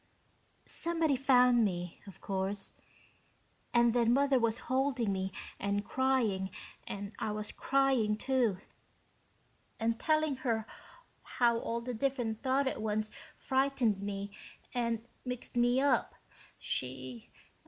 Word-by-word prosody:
"Somebody 330 -4 +2
found 250 -2 +5
me, 180 -4 -2
of 195 - -12
course. 195 +1 -2 1.0
And 235 -1 +4
then 235 -1 +3
Mother 275 0 +4
was 230 0 0
holding 255 -5 +1
me 190 0 -2 0.3
and 200 +1 -1
crying 235 -8 +1 0.4
and 200 +1 -5
I 215 - -1
was 210 0 -3
crying, 265 -6 +2
too, 245 -6 +1 1.2
and 230 0 0
telling 310 -3 +2
her 230 -4 -1 0.6
how 235 -2 +2
all 235 0 -2
the 250 +1 -4
different 240 -3 -1
thought 270 +1 +1
at 265 - -2
once 215 0 -1 0.3
frightened 260 -6 +1
me 200 0 -4 0.4
and 230 -2 -1 0.2
mixed 250 -1 -5
me 245 +1 +3
up. 280 +1 +2 0.4
She 130 -2 -3
235 Hz, 120 wpm, -32 LUFS, 205-260 Hz, 1.2 s, found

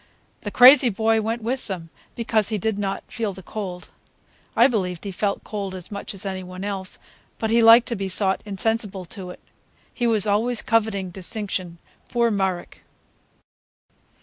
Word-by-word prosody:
The 205 - -4
crazy 255 +3 +8
boy 220 +1 +1
went 225 +1 -3
with 255 +3 -2
them, 170 -5 -6 0.2
because 220 -3 +1
he 215 - -1
did 205 +1 -1
not 195 -1 -2
feel 220 -4 -3
the 190 0 -11
cold. 185 -3 -6 0.7
I 235 - +6
believed 185 -9 0
he 200 - -4
felt 200 +2 -2
cold 200 -3 -5
as 185 +1 -9
much 200 0 -6
as 195 - -4
any 190 -1 -3
one 185 +1 -8
else, 195 -2 -3 0.4
but 220 -1 -2
he 230 +1 +4
liked 230 +1 +8
to 235 - -1
be 195 -2 -3
thought 190 0 -1
insensible 205 -2 -2
to 185 +1 -7
it. 180 - -10 0.5
He 240 - 0
was 220 -3 +4
always 220 +3 +1
coveting 210 -5 0
distinction, 185 -2 -4 0.3
poor 235 -1 +2
Marek! 190 -3 -2
205 Hz, 170 wpm, -23 LUFS, 190-225 Hz, 0.7 s, crazy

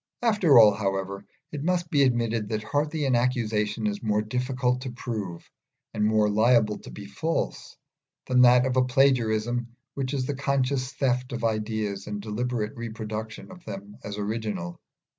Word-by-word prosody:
After 205 - +5
all, 110 -3 +8
however, 100 -1 -3 0.2
it 150 -1 -5
must 175 0 0
be 145 -3 +3
admitted 115 -4 +1
that 110 -1 -2
hardly 150 +5 -1
any 125 -3 +3
accusation 110 -3 0
is 105 -1 -1
more 105 -1 +1
difficult 125 +2 -1
to 130 - -4
prove, 105 -8 -5 0.5
and 105 - -1
more 110 0 +3
liable 110 0 +3
to - - -12
be 100 - -9
false, 155 +12 -3 0.5
than 125 -1 +3
that 125 0 +6
of 130 -1 0
a 130 - +5
plagiarism 120 -2 +1 0.2
which 135 0 -3
is 130 -2 -1
the 145 - -2
conscious 135 -1 0
theft 125 -2 -1
of 120 -1 -4
ideas 110 -2 -2
and 105 0 -4
deliberate 110 +1 -3
reproduction 110 - -6
of 180 -2 -13
them 100 0 -8
as 105 0 -6
original. 105 -5 -3
115 Hz, 160 wpm, -26 LUFS, 105-130 Hz, 0.5 s, all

